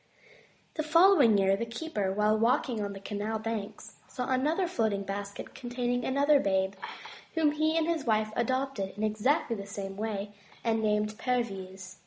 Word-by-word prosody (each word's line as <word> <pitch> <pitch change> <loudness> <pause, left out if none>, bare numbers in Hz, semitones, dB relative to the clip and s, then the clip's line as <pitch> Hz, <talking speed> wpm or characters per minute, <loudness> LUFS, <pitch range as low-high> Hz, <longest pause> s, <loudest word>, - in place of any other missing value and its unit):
The - - +1
following 310 - +6
year, 195 0 +3
the 200 - -3
keeper 230 -6 -2
while 210 +2 +2
walking 235 +1 +1
on 200 -1 -3
the 195 - -8
canal 205 +2 -3
banks, 220 -2 -5
saw 250 -3 -4
another 305 +8 +1
floating 220 - 0
basket, 200 +1 -6
containing 245 -1 -2
another 280 +3 +3
babe, 190 -3 +1 0.6
whom 315 -2 +3
he 310 +2 +1
and 325 - +2
his 330 -3 -1
wife 215 -2 +1
adopted 250 -5 -1
in 210 - -3
exactly 230 +4 +1
the 200 -1 -7
same 195 -1 -6
way, 205 -1 -3 0.3
and 225 -1 +1
named 210 0 0
Perviz. 190 -6 -3
220 Hz, 160 wpm, -29 LUFS, 200-265 Hz, 0.6 s, following